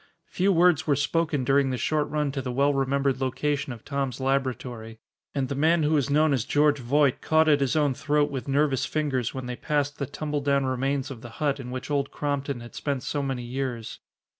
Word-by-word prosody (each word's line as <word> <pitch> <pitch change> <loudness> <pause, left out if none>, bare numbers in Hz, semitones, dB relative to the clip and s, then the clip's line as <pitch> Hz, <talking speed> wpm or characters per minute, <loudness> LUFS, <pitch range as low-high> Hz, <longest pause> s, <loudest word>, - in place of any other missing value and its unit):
Few 190 +2 +1
words 170 -3 +4
were 145 - +4
spoken 145 0 0
during 135 +1 +3
the 130 - -1
short 150 +3 0
run 150 -2 0
to 135 -1 -3
the 125 -1 -4
well 140 +3 +2
remembered 135 0 0
location 140 +2 -1
of 115 -2 -9
Tom's 140 -3 -2
laboratory, 125 -4 -2 0.4
and 135 -2 0
the 140 - -3
man 160 +4 +3
who 150 - +2
was 145 -3 +2
known 150 +1 +3
as 130 -5 +1
George 145 0 +2
Voight 140 +2 +2
caught 160 0 +3
at 145 -2 +5
his 140 +2 0
own 145 -3 +2
throat 150 +1 +1
with 135 -1 -5
nervous 140 -1 +1
fingers 135 -7 -1
when 130 -1 -4
they 125 0 -4
passed 145 +1 -1
the 140 - -2
tumbledown 145 -2 -1
remains 135 +2 -1
of 120 -4 -8
the 120 - -9
hut 145 -2 0
in 125 -2 -7
which 130 +3 -5
Old 140 -1 0
Crompton 140 -3 -3
had 120 - -11
spent 140 -3 -3
so 145 - -2
many 135 -3 -3
years. 120 -2 -4
140 Hz, 215 wpm, -26 LUFS, 130-150 Hz, 0.4 s, at